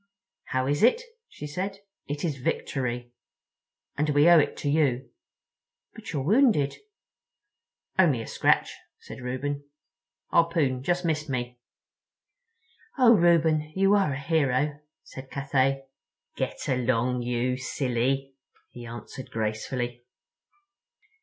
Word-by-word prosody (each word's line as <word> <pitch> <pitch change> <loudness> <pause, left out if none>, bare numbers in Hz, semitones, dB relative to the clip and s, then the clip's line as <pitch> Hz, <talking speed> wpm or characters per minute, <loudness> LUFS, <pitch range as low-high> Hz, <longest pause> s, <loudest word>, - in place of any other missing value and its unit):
"How 130 0 -1
is 145 +2 0
it?" 255 - +4 0.3
she - - -9
said. 185 +7 -4 0.3
"It 145 +3 -3
is 145 -5 -2
Victory. 125 -2 -3 0.8
And 150 +1 0
we 145 +2 +4
owe 175 -1 +8
it 145 - 0
to - - -4
you. 140 -4 +1 0.8
But - - -9
you're 140 - -2
wounded?" 205 - +3 1.2
"Only 145 -11 +4
a - - -8
scratch," - - +2 0.2
said - - -11
Reuben; 140 +3 -3 0.7
"harpoon 165 -6 +2
just 175 +5 0
missed 155 -2 -1
me." 125 -2 -3 1.4
"Oh, 245 -3 +7
Reuben, 160 -5 +3
you 195 +1 +4
are 195 -8 +3
a - - -5
hero," 145 -1 +1 0.2
said 130 0 -11
Cathay. 135 0 0 0.5
"Get - - -3
along, 125 -1 +1
you 125 +1 -1
silly," 135 +1 -1 0.4
he 120 -1 -9
answered 120 +2 -9
gracefully. 120 +3 -3
140 Hz, 115 wpm, -27 LUFS, 125-160 Hz, 1.4 s, owe